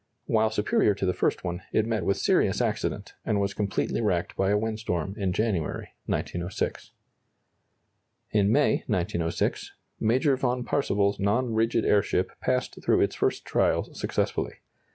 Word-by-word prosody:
While 110 -1 +2
superior 105 -1 +2
to 95 - -2
the 90 - +1
first - - 0
one, 90 -1 -3
it 110 - +2
met 115 -1 -1
with 100 - +1
serious - - +2
accident, - - -2
and 105 - 0
was 100 0 0
completely 105 +2 -1
wrecked 90 -6 0
by 95 0 +1
a 105 - +3
windstorm 105 -6 -2
in 100 -4 -1
January, 100 -5 -1 0.2
1906. 85 +2 -3 1.4
In 105 -1 +3
May, - - +4
1906, 85 -1 -1 0.3
Major 130 +5 +3
von 125 -1 0
Parseval's 100 -7 +1
non 115 +5 +1
rigid 115 +1 +1
airship 100 -3 +2
passed 125 0 -1
through - - +3
its - - +2
first - - -1
trials - - +1
successfully. - - -1
105 Hz, 145 wpm, -27 LUFS, 95-110 Hz, 1.4 s, May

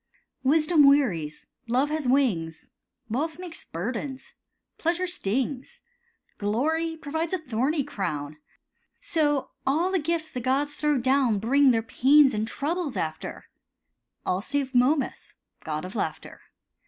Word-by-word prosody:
Wisdom 305 +1 +5
wearies, 185 - +1 0.2
Love 260 +5 +1
has 310 -4 -1
wings— 200 - +1 0.4
Wealth 300 +8 -2
makes 355 -2 -8
burdens, 250 - -5 0.5
Pleasure 345 +2 0
stings, 270 - -2 0.6
Glory 315 +11 0
proves 320 +3 -3
a - - +2
thorny 280 +1 -1
crown— 150 - -4 0.6
So 295 -4 0 0.2
all 325 +7 +2
gifts 320 0 -2
the 250 - -4
gods 275 +4 0
throw 300 -1 +1
down 260 -3 +2
Bring 270 +7 +4
their 225 -3 +2
pains 270 +4 +5
and 215 +1 -1
troubles 300 +3 -2
after; 160 0 -4 0.8
All 180 +1 0
save 275 +3 -2
Momus, 260 +4 +1 0.3
god - - -3
of - - -8
laughter. - - -4
275 Hz, 120 wpm, -26 LUFS, 230-310 Hz, 0.8 s, Wisdom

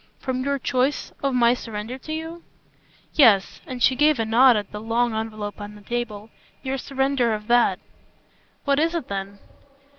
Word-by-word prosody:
"From 255 -1 -3
your 280 +1 0
choice 265 +1 -1
of 275 -2 0
my 240 -1 +5
surrender 225 +1 -6
to 310 - -9
you?" 325 +2 -5 0.7
"Yes" 220 -9 +4
and 250 -2 -4
she 260 - +5
gave 300 +2 +4
a 225 - 0
nod 240 +2 +5
at 205 -2 -5
the 210 - -6
long 230 +1 0
envelope 215 -2 -5
on 205 0 -8
the 210 - -14
table 225 -2 -4 0.3
"your 270 0 -2
surrender 265 -4 0
of 210 0 -8
that." 240 +1 +3 0.9
"What 280 0 +2
is 330 +2 +1
it 330 -6 -4
then?" 200 0 -5
240 Hz, 175 wpm, -23 LUFS, 215-275 Hz, 0.9 s, my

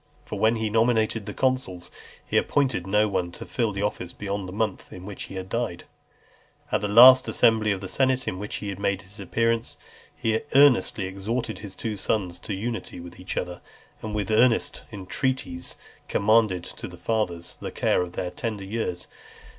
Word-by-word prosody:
For 105 - -5
when 110 +3 +4
he 110 -1 -1
nominated 110 -2 +2
the - - -4
consuls, 130 -9 -1 0.3
he - - -5
appointed 130 -11 +1
no 105 +2 +3
one 90 -3 -1
to - - -8
fill 115 -4 -1
the 100 +1 -3
office 90 -4 -3
beyond 100 -2 -4
the - - -7
month 105 0 -2
in 90 0 -9
which 100 -1 -7
he - - -10
died. 95 -2 -3 0.9
At - - +1
the 105 - 0
last 125 +5 +9
assembly 110 -2 +3
of 95 -2 -2
the 95 - -5
senate 130 +3 +1
in 90 - -2
which 105 +1 -5
he 100 -1 -4
made 100 0 -1
his 100 +3 -13
appearance, 115 +4 0 0.4
he 110 -1 0 0.2
earnestly 135 -7 +5
exhorted 110 +5 -3
his 100 -3 -9
two 110 0 -4
sons 95 -3 -1
to 100 - -4
unity 115 -1 -4
with 85 +1 -11
each 90 - -6
other, 90 -1 -3 0.4
and 110 -1 -4
with 105 -1 -1
earnest 115 +2 +3
entreaties 100 -2 -2 0.3
commended 105 -4 +3
to - - -8
the - - -11
fathers 90 -7 -2
the - - -4
care - - +1
of 90 -1 -4
their 90 - -3
tender 115 -8 -4
years. 95 -3 -3
105 Hz, 180 wpm, -25 LUFS, 95-115 Hz, 0.9 s, last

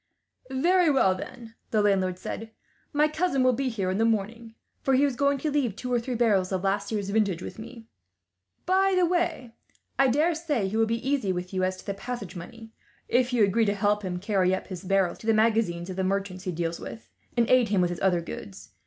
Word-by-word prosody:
"Very 345 +6 +3
well 265 -10 +4
then," 230 +4 -9 0.2
the 215 -2 +2
landlord 190 -3 +2
said; 225 +4 -6 0.4
"my 300 0 +3
cousin 305 -3 0
will 255 0 +4
be 265 +2 -1
here 195 -6 -2
in 190 - -1
the - - +3
morning, 225 +1 -1 0.3
for 270 - +2
he 270 - +4
is 280 -3 +1
going 280 +1 +2
to 300 +2 -2
leave 265 -8 0
two 250 +2 -4
or 240 - +3
three 245 +2 -4
barrels 205 -6 +2
of 190 -1 -1
last 200 +2 -1
year's 200 -2 -2
vintage 200 -5 +1
with - - -8
me. 230 0 -10 0.8
By 380 +1 +3
the 365 - +4
way, 340 -9 -1 0.5
I 270 - +6
daresay 300 - +1
he 195 - -4
will 225 0 +3
be 230 +3 -2
easy 270 -9 +1
with 180 +1 -4
you 185 0 0
as 185 0 0
to - - -13
the 200 - -2
passage 205 -2 -6
money, 225 +6 -10 0.4
if 250 +1 +2
you 240 -3 +3
agree 215 +3 +3
to 205 0 +1
help 205 +1 +1
him 185 -3 -3
carry 190 -1 +1
up - - -8
his 180 -3 -7
barrels 190 -2 +1
to 225 - -9
the 225 - +4
magazine 215 -6 +2
of 185 +1 -6
the 190 - -1
merchant 195 -1 -2
he 185 -1 -3
deals 170 0 -3
with, 225 - -9 0.3
and 235 -1 +3
aid 250 -4 +4
him 200 -2 +2
with 175 -1 +2
his 175 - -6
other 180 -3 +2
goods. 100 - -9
220 Hz, 230 wpm, -27 LUFS, 190-255 Hz, 0.8 s, I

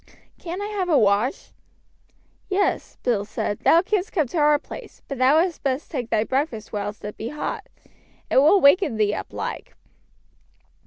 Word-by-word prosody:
Can't 360 +3 -5
I - - -3
have 405 -4 -3
a 310 - +4
wash?" 210 +5 +1 1.0
"Yes," 395 +1 -1
Bill 225 -5 +1
said, 205 0 -3
"thou 335 +2 +4
canst 405 +1 -1
come 315 -6 +1
to 330 - -2
our 295 0 +5
place; - - -11
but 275 -3 -6
thou 260 +4 +5
had 345 0 0
best 270 +1 -2
take 245 -6 -4
thy 220 -2 +2
breakfast 255 -4 -2
whilst 205 0 -4
it 210 - -7
be 225 - -5
hot. 300 - -5 0.6
It - - +3
will 305 +9 +6
waken 285 - +4
thee 210 -1 +2
up - - -6
like." - - -6
280 Hz, 170 wpm, -23 LUFS, 220-345 Hz, 1.0 s, will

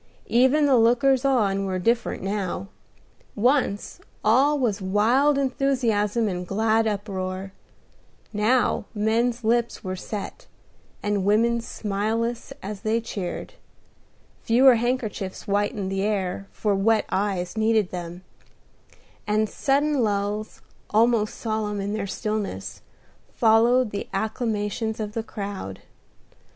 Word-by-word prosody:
Even 260 +5 +4
the 270 -3 +5
lookers 245 +3 +4
on 200 -7 +2
were 185 -1 -1
different 230 +4 0
now. 195 -1 -3 0.7
Once 240 -2 +1 0.2
all 270 +7 +4
was 225 -7 0
wild 235 +10 +3
enthusiasm 245 -5 +1
and 180 -2 -3
glad 220 +3 +2
uproar; 195 -2 -3 0.8
now 220 +5 +2
men's 230 +3 +1
lips 235 +1 0
were 185 -1 -3
set, 200 +2 -7 0.6
and 205 -2 0
women's 230 +3 +2
smileless 225 +3 -2
as 200 0 -6
they 220 +1 +1
cheered; 205 - -5 0.9
fewer 255 +3 +6
handkerchiefs 230 -5 -2
whitened 205 -1 -1
the 195 0 -1
air, 195 -2 -1
for 210 -2 0
wet 215 +3 +2
eyes 190 -2 -1
needed 220 -3 +2
them; 175 0 -6 1.0
and 215 +1 +2
sudden 285 +3 +1
lulls, 205 0 -2 0.3
almost 220 0 +2
solemn 215 -2 -2
in 200 +1 -2
their 210 -2 -2
stillness, 210 - -4 0.5
followed 230 +1 +4
the 200 - -5
acclamations 220 0 -2
of 210 -1 -4
the 225 - -2
crowd. 200 - -6
215 Hz, 115 wpm, -24 LUFS, 200-235 Hz, 1.0 s, fewer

